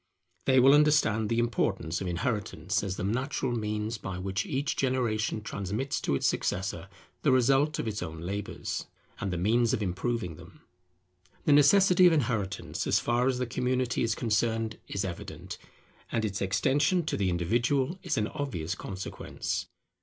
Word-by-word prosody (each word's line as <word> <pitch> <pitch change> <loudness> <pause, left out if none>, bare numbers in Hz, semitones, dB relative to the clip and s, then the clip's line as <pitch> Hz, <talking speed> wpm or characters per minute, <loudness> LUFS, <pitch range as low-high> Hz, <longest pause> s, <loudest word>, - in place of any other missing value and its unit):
They 130 -1 +5
will 135 +2 +7
understand 145 -8 +4
the 115 - 0
importance 100 -8 0
of 95 - -3
inheritance, 100 - -1
as 95 -2 -2
the - - -3
natural 125 +5 -1
means 105 -1 -2
by 95 -2 -5
which 95 +1 -2
each 140 +2 -1
generation 115 -5 0
transmits 105 +7 -3
to 70 - 0
its - - -1
successor 95 +1 -1 0.3
the 150 - +3
result 135 +4 +3
of - - -3
its 105 -1 -3
own 80 0 -5
labours 100 +4 -4 0.3
and 100 - -2
the 90 - -2
means 115 +6 +2
of 110 - -3
improving 95 -2 -2
them. - - -15 0.8
The 150 - +5
necessity 180 +5 +6
of 175 - +5
inheritance, 110 -9 -1
as - - +4
far 120 +2 +1
as 130 -2 +1
the 125 - -1
community 125 0 0
is 115 -2 +1
concerned, 115 -1 0
is 100 0 -2
evident, 85 -2 -7 0.5
and 110 -1 0
its 100 -2 -3
extension 145 - +2
to - - -1
the 100 -2 +1
individual 120 - +1
is 175 -6 -2
an 105 - +2
obvious 115 - -3
consequence. 95 -1 -5
115 Hz, 160 wpm, -29 LUFS, 95-130 Hz, 0.8 s, will